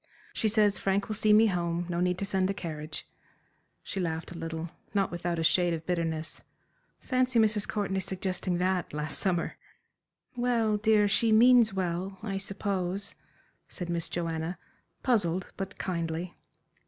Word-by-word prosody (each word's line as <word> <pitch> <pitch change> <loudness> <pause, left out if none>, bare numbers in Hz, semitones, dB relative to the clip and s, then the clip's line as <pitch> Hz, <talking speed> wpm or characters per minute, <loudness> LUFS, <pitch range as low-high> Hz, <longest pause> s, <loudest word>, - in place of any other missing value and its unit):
She 220 - +1
says 210 -2 +3
'Frank 195 +1 0
will - - -1
see 215 +1 +3
me 215 +2 +7
home 175 -3 0
no 170 -1 -2
need 180 0 +1
to 200 - -2
send 190 -1 +1
the 200 - -1
carriage.'" 155 -4 -5 0.8
She 195 - -4
laughed 165 -2 -3
a - - -8
little, 165 0 -5 0.2
not 195 -1 +2
without 175 0 -2
a 165 - -1
shade 170 +1 +3
of 160 0 -8
bitterness. 165 -3 -2 0.6
"Fancy 255 -1 +1
Mrs. 215 -2 +3
Courtenay 195 -2 -1
suggesting 185 -1 -2
that 180 -2 0
last 150 +1 0
summer!" 180 -3 0 0.8
"Well, 235 -3 +1
dear, 210 -1 +4
she 225 +2 +3
means 235 0 +6
well, 185 +1 -2
I 195 -3 -2
suppose," 195 -1 -1 0.6
said 180 -2 -6
Miss 170 -1 -1
Joanna, 165 0 -2 0.5
puzzled 190 -7 +1
but 195 0 -5
kindly. 170 -1 -3
185 Hz, 155 wpm, -29 LUFS, 170-205 Hz, 0.8 s, me